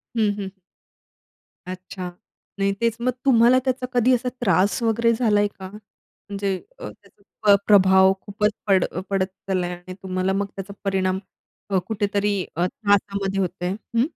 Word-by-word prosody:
हं, 210 -2 +2
हं. 195 -2 -5 1.2
अच्छा, 185 0 -6 0.5
नाही 195 0 +2
तेच 230 -1 +2
मग 255 - +2
तुम्हाला 250 0 +6
त्याचा 255 -1 0
कधी 250 +1 +4
असा 250 +1 -2
त्रास 200 +2 +2
वगैरे 230 +1 +2
झालाय 210 -3 +2
का, 190 -2 -10
म्हणजे 200 -1 -6 0.2
अ, - - -6
त्याचा - - -20 0.2
प्र 205 -1 +7
प्रभाव 190 -2 +6
खूपच 210 +1 0 0.2
पड 190 -2 +4
अ, 180 - -4
...पडत 195 -1 +1
चाललाय 185 -2 -3
आणि 180 +1 -10
तुम्हाला 185 0 -1
मग 200 +1 0
त्याचा 195 +1 -7
परिणाम 190 -1 0 0.5
अ, 195 - +2
कुठेतरी 205 -1 0 0.2
अ, 175 +2 +1
त्रासामध्ये 200 -1 0
होत 185 - +1
आहे, 180 - 0
हं? 230 +4 -1
200 Hz, 155 wpm, -23 LUFS, 190-220 Hz, 1.2 s, प्र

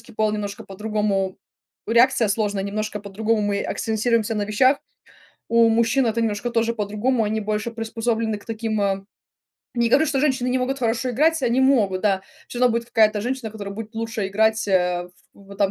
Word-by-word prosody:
женский 230 - -16
пол 215 0 +1
немножко 205 -1 -4
по-другому 200 -1 -2 0.5
реакция 240 0 +4
сложная 205 -1 0
немножко 210 +1 -3
по-другому. 210 +2 -1
Мы 200 - -1
акцентируемся 225 0 0
на 205 -1 -1
вещах. 255 +6 +3 0.7
У 230 0 +5
мужчин 235 +3 +2
это 230 +1 0
немножко 220 +1 -1
тоже 230 0 +1
по-другому. 220 +3 0
Они 215 +1 -1
больше 215 +2 -2
приспособлены 225 -1 -2
к - - -19
таким, 220 -2 -2
а 195 -1 -1 0.7
Не 235 -1 +2
говорю, 305 +6 +4
что 275 -2 0
женщины 260 -4 +1
не 255 - +1
могут 265 +2 -1
хорошо 240 +2 0
играть, 310 +4 +2
они 245 +1 +2
могут, 220 -9 +3
да. 195 -3 +2 0.3
Всё 240 - -6
равно 250 -2 +4
будет 235 0 -2
какая-то 215 -2 +3
женщина, 250 -2 -3
которая 205 -2 -7
будет 225 +1 -8
лучше 225 -2 -3
играть, 220 +1 +1
а, 180 -2 +1 0.3
в 200 - -18
вот 200 - -11
там 195 -1 +3
220 Hz, 185 wpm, -22 LUFS, 205-235 Hz, 0.7 s, У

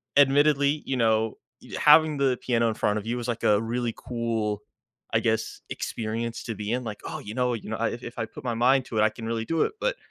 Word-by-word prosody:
admittedly, 145 0 +5
e - - -16
you 135 - -1
know, 110 -2 +2 0.4
having 150 0 +6
the 135 -3 +2
piano 115 -2 +2
in - - -1
front 105 0 +1
of 105 - -10
you 120 +2 -2
is 120 - -5
like 120 -1 -3
a 105 0 +4
really 120 +1 -2
cool, 115 -3 -2 0.5
I - - +4
guess, - - -1
experience 115 +1 -3
to 115 - -4
be 105 +1 -4
in. 125 +1 -1
Like, 105 -2 -6
"Oh, - - -5
you 105 - -8
know 125 0 +1
you 115 - -6
know, 110 - -2
I 115 - +1
i 120 - -5
if 120 0 -9
I 115 - -1
put - - -12
my 120 - 0
mind 125 +3 +3
to 115 - -5
it, - - +4
I 110 - +5
can 115 +1 -9
really 115 0 -2
do 165 +3 +1
it." - - -2
But - - 0
115 Hz, 255 wpm, -26 LUFS, 110-130 Hz, 0.5 s, having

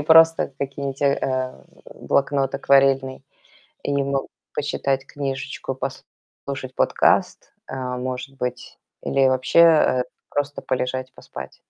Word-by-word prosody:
просто 160 -1 +5
какие-нибудь, 140 0 -4
э, 140 0 +3
э, 130 -1 -2 0.4
блокнот 140 -1 +1
акварельный. 135 -1 +3 0.6
И 145 - -2
могу 135 0 -1 0.3
почитать 135 -2 -1
книжечку, 135 -1 -4
послушать 135 0 -7
подкаст, - - +2 0.2
э, - - -5
может 130 +1 -4
быть, 125 0 -5 0.2
или 135 -1 +2
вообще, 130 +5 +3
э, 155 -6 +6 0.3
просто 145 0 -2
полежать, 130 0 -2
поспать. - - -9
135 Hz, 110 wpm, -23 LUFS, 130-140 Hz, 0.6 s, э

